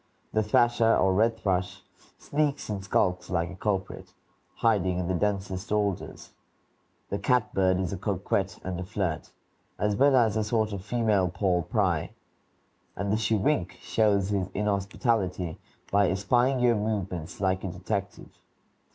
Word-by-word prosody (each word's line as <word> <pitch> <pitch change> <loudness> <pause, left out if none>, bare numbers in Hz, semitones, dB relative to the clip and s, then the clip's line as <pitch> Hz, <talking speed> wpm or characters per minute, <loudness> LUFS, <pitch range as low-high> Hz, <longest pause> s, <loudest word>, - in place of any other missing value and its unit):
The 110 - +3
thrasher, 115 +1 +3
or 95 - +3
red 115 +3 +2
thrush, 95 -1 -2 0.3
sneaks 145 -4 -1
and 100 -2 -3
skulks 90 -2 0
like 90 0 -1
a - - -8
culprit, 95 -1 -3 0.4
hiding 95 -6 +1
in 90 -1 -2
the 95 - 0
densest 95 +1 -2
alders; 105 -3 -2 0.8
the 100 - -1
catbird 100 -5 +2
is 95 -1 -2
a - - -3
coquette 95 -1 -1
and 90 -1 -4
a - - -3
flirt, 90 -4 -3 0.5
as 105 0 0
well 140 +4 +4
as 115 -4 +3
a 110 - +1
sort 110 0 0
of 95 -2 -5
female 105 -4 +1
Paul 90 -1 +1
Pry; 90 -2 0 0.8
and 100 +1 -2
the - - +3
chewink 110 - +1
shows 100 -3 +1
his 100 -3 0
inhospitality 100 -3 -1 0.3
by 100 -2 +4
espying 120 +8 +2
your 120 -1 +4
movements 95 -6 -3
like 95 -1 0
a - - -2
detective. 95 +2 -5
100 Hz, 145 wpm, -27 LUFS, 95-110 Hz, 0.8 s, well